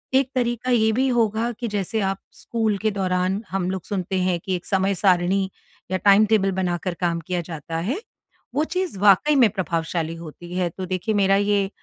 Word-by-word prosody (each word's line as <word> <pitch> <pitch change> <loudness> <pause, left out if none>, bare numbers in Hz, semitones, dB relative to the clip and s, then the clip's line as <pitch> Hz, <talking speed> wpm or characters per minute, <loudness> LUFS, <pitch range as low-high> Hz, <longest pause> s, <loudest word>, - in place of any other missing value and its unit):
एक 265 -1 +3
तरीका 245 0 0
ये 220 -2 +4
भी 260 +4 +2
होगा 230 -1 +1
कि 240 - -2
जैसे 205 +1 -2
आप 195 - -2 0.2
स्कूल 220 -3 -1
के 215 +2 0
दौरान 185 0 0
हम 185 -1 -1
लोग 190 -2 -4
सुनते 190 -2 -3
हैं 180 -1 +1
कि 190 - 0
एक 175 - -6
समय 195 0 +1
सारिणी 190 0 +2 0.4
या 185 - +2
टाइम 200 +3 +5
टेबल 205 -3 +2
बनाकर 180 0 -1
काम 170 -1 +1
किया 180 -1 -1
जाता 165 -1 -6
है। 205 - -1 0.6
वो 295 - +2
चीज़ 365 - -3
वाक़ई 210 +9 +5
में 245 -6 +6
प्रभावशाली 165 -3 -2
होती 170 +1 -10
है। 180 -1 0
तो 185 +3 -6
देखिए 185 +4 -2
मेरा 195 -1 +4
ये 200 -1 +2
195 Hz, 195 wpm, -23 LUFS, 180-220 Hz, 0.6 s, में